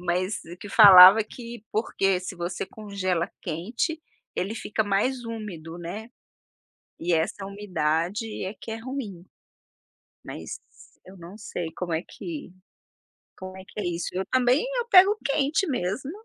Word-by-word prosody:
mas 180 +3 -1
o 170 +2 -10
que 205 - -10
falava 200 0 +10
que 235 -1 -10
porque 195 -4 +1
se 185 0 -7
você 175 +2 -3
congela 190 -4 -3
quente, 230 - -3 0.4
ele 200 +5 -2
fica 220 -1 -2
mais 235 +5 0
úmido, 190 -8 -7
né, 190 +7 -7 0.9
e 175 +1 0
essa 165 +4 -1
umidade 190 +1 -2
é 195 - -5
que 225 - -8
é 225 - -4
ruim. 225 -8 -6 1.0
Mas - - -7 0.4
eu 190 +1 -14
não 175 +4 -11
sei 175 -5 -5
como 175 -2 -3
é 160 - -1
que 305 - -8 0.9
como 185 0 -8
é 190 - -11
que 210 - -7
é - - -4
isso. 175 -1 -2
Eu 190 +1 -2
também, 255 - +3
eu 475 - -2
pego 390 -1 +7
quente 285 +6 +1
mesmo. 250 +3 -2
200 Hz, 150 wpm, -25 LUFS, 180-230 Hz, 1.0 s, falava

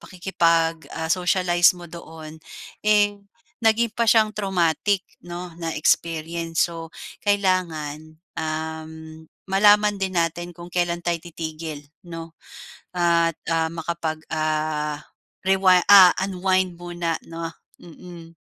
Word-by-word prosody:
pakikipag 165 -3 0
ah, 160 0 -4
socialize 180 -1 +3
mo 175 - -10
doon, 160 -1 -11 0.4
eh, 210 -1 +4 0.5
naging 225 +1 +3
pa 235 0 0
siyang 215 -2 +4
traumatic 190 -1 0 0.2
'no, 175 0 -7
na 165 -1 -3
experience. 165 +2 0
So 165 -1 -8 0.3
kailangan, 160 -6 -1 0.2
uhm, 160 0 -6 0.2
malaman 205 +1 +4
din 190 -1 -2
natin 175 +1 -2
kung 175 0 -11
kailan 175 -1 -1
tayo 170 0 -1
titigil 160 -2 -6 0.2
'no, 165 -1 -9 0.6
at 170 -2 +2
ah, 165 -1 +1
makapag 165 -1 -4
ah, 155 -1 -1 0.4
rewind 190 -1 +4
ah 195 -3 +9
unwind 185 -1 0
muna 175 -1 -3
'no? 165 0 -6 0.3
Mm. 170 -1 -13
170 Hz, 110 wpm, -23 LUFS, 160-185 Hz, 0.6 s, ah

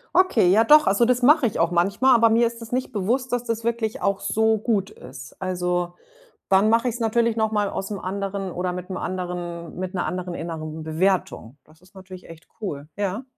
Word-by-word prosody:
Okay, 360 - +4
ja 215 +4 +5
doch, 300 +5 +6
also 200 +5 +3
das 250 +1 +1
mache 290 +3 +5
ich 220 - -1
auch 165 - +3
manchmal, 195 +9 +3
aber 230 -1 +5
mir 230 +1 +3
ist 230 0 -8
es 225 - -12
nicht 255 +1 -2
bewusst, 240 +5 -1
dass 245 -1 -1
das 230 -1 -3
wirklich 230 -1 -2
auch 200 -1 0
so 220 +3 +1
gut 205 -2 -1
ist. 130 - -12
Also, 180 -1 -2 0.6
wann 195 +2 +4
mache 230 +3 +3
ich's 240 0 -4
natürlich 230 0 +1
noch 220 -1 0
mal 205 -2 0
aus 195 - -5
'nem 205 - -4
anderen 195 0 -4
oder 180 +1 -2
mit'm 180 +1 -6
anderen 175 -2 -5
mit 185 +1 -5
'ner 180 - -1
anderen 180 -1 -4
inneren 160 -2 -6
Bewertung. 160 -6 -1
Das 155 +1 -23
ist 185 +2 -24
natürlich 185 -1 -12
echt 165 0 -14
cool, 150 -8 -5
ja. 205 +4 -2
195 Hz, 205 wpm, -23 LUFS, 180-230 Hz, 0.6 s, doch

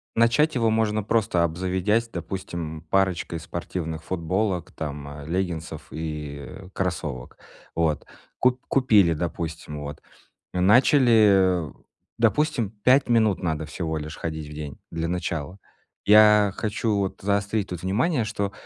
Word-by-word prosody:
начать 120 +7 +3
его 115 -3 +2
можно 110 -1 +1
просто 100 -4 +1
обзаведясь, 95 +6 0
допустим, 85 -7 -5
парочкой 95 -3 +1
спортивных 80 -1 -5
футболок, 90 +2 -1
там, 75 -2 -5
э, 70 0 -9
леггинсов 85 -2 -3
и, 75 -2 -5
э, 90 +6 -10
кроссовок. 75 -9 -4 0.4
Вот, 80 -3 0 0.3
куп 125 0 +2
купили, 105 -10 +4
допустим, 80 -2 -4
вот 75 +1 -7 0.5
начали, 100 - +5
э, 75 - -10 0.5
допустим, 120 -1 +2
5 130 +1 +4
минут 110 -4 +3
надо 80 -3 -2
всего 80 +1 -3
лишь 75 +1 -6
ходить 80 -2 -5
в - - -8
день 75 -2 -7
для 80 0 -2
начала. 85 -1 -3 0.5
Я 105 -1 +6
хочу 110 0 -1
вот 95 -1 -2
заострить 100 +1 0
тут 90 -2 -5
внимание, 115 - +1
что 100 -2 -2
95 Hz, 130 wpm, -25 LUFS, 80-110 Hz, 0.5 s, Я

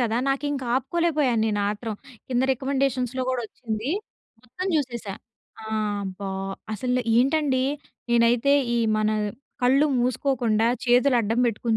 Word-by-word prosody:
గదా! 230 -1 +1
నాకింక 275 0 -1
ఆపుకోలేకపోయాను 285 -4 +1
నేను 210 -2 0
ఆత్రం. 215 +1 -4 0.3
కింద 250 -1 +1
రికమెండేషన్స్‌లో 265 -1 -1
గూడొచ్చింది. 235 -1 -3 0.5
మొత్తం 255 +10 -6
జూసేశా. 235 -8 -2 0.5
ఆ! - - -10 0.4
అబ్బా! 195 +1 -5 0.4
అసలు 250 +4 0 0.2
ఏంటండి? 265 0 +2 0.5
నేనైతే 235 +3 +4 0.2
ఈ - - +2 0.2
మన 215 - +1 0.5
కళ్ళు 270 +4 +4
మూసుకోకుండా, 240 -3 +1 0.2
చేతులు 250 +1 +4
అడ్డం 225 +2 0
బెట్టుకొని 230 0 0
250 Hz, 110 wpm, -25 LUFS, 225-270 Hz, 0.5 s, నేనైతే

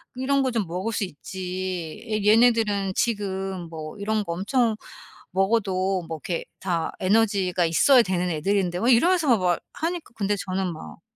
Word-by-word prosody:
이런 270 +2 +1
거 260 - 0
좀 225 -6 -1
먹을 185 +7 -3
수 210 - 0
있지. 185 +2 -5
애 215 -2 -1
얘네들은 215 -3 +3
지금 195 -4 -1
뭐 155 +2 -8
이런 210 +1 -1
거 170 - -4
엄청 220 +5 +1 0.6
먹어도 195 -1 +1
뭐 160 - -4
이렇게 165 +3 -4
다 170 -4 -1
에너지가 190 -3 +2
있어야 235 - +5
되는 180 -3 -1
애들인데." 180 +2 0
막 235 - +3
이러면서 300 +1 +4
막 180 -2 +1
하니까 335 +1 -4
근데 205 -1 0
저는 190 -2 -2
막 80 - -10
195 Hz, 305 characters per minute, -24 LUFS, 180-225 Hz, 0.6 s, 있어야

